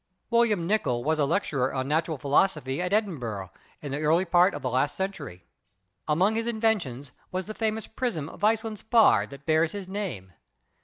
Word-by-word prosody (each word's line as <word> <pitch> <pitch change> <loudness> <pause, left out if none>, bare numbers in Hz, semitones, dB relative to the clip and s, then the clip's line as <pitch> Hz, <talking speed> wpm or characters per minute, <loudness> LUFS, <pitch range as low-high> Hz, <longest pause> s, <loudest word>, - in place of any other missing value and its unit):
William 230 -7 +3
Nicol 170 - 0
was 155 +2 0
a 145 - +3
lecturer 140 -5 0
on 130 0 -2
Natural 160 +1 0
Philosophy 140 0 +1
at 180 +1 -2
Edinburgh 125 - -2 0.3
in 145 - -5
the 145 +2 -3
early 165 +4 +3
part 175 +2 +4
of - - -7
last 130 +3 0
century. 190 - -5 0.6
Among 180 +8 +3
his 230 +1 -2
inventions 205 - -1 0.2
was 185 0 -3
the 215 - -6
famous 220 0 -2
prism 225 - -3
of 180 - -12
Iceland 220 0 +1
spar 220 - +4
that 140 +2 -12
bears 160 +1 +2
his 200 -2 -6
name. 185 - -5
170 Hz, 170 wpm, -27 LUFS, 140-210 Hz, 0.6 s, part